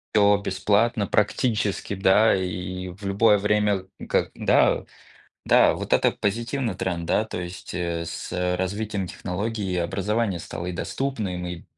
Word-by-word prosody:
Всё 100 -1 +5
бесплатно, 105 +3 +1
практически, 105 -1 0
да, 100 +3 +4
и 90 0 -4
в 100 +3 -10
любое 105 +2 +4
время. 105 -1 +1 0.2
Ка - - +1
да, - - +3 0.6
да, - - +5
вот - - -6
это - - +4
позитивный 115 +2 -2
тренд, 90 -2 -2
да. 105 +6 +1
То 110 - -5
есть, 90 0 -7
э, 85 -2 -2
с 85 +1 -6 0.2
развитием 100 +1 -2
технологий 100 +3 -3
и - - 0
образование 100 +3 -1
стало 85 +1 -6
и 90 - -3
доступным, 100 -3 -3
и 90 -1 -6
100 Hz, 145 wpm, -24 LUFS, 90-105 Hz, 0.6 s, Всё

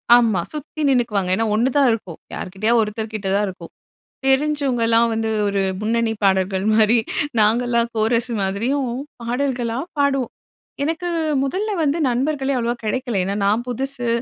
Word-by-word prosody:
ஆமா, 225 -7 +3
சுத்தி 305 +1 -6
நின்னுக்குவாங்க. 230 -7 +1
ஏன்னா 225 +3 0
ஒன்னுதான் 265 +4 +3
இருக்கும். 190 -7 -4
யார்க்கிட்டயா 200 +5 -1
ஒருத்தர் 215 +1 -4
கிட்ட 210 -3 -4
தான் 205 +1 +2
இருக்கும். 180 -3 -9 0.6
தெரிஞ்சவங்கலாம் 265 -5 +2
வந்து 225 0 -1 0.2
ஒரு 200 0 0 0.2
முன்னணி 225 +1 0
பாடகர்கள் 190 0 +2
மாரி, 220 +2 +4 0.4
நாங்கலாம் 235 +2 +2
கோரஸ் 230 +2 +1
மாதிரியும் 235 +7 -1 0.3
பாடல்களா 245 -1 -1 0.2
பாடுவோம். 275 -3 +1 0.5
எனக்கு 330 +3 -2 0.4
முதல்ல 390 +10 -2
வந்து 295 +3 +1
நண்பர்களே 270 +2 0
அவ்ளோவா 235 +1 -1
கிடைக்கல. 235 -2 -1
ஏன்னா 200 +2 -2
நான் 220 +4 +1
புதுசு. 250 0 -2
235 Hz, 130 wpm, -21 LUFS, 215-265 Hz, 0.6 s, மாரி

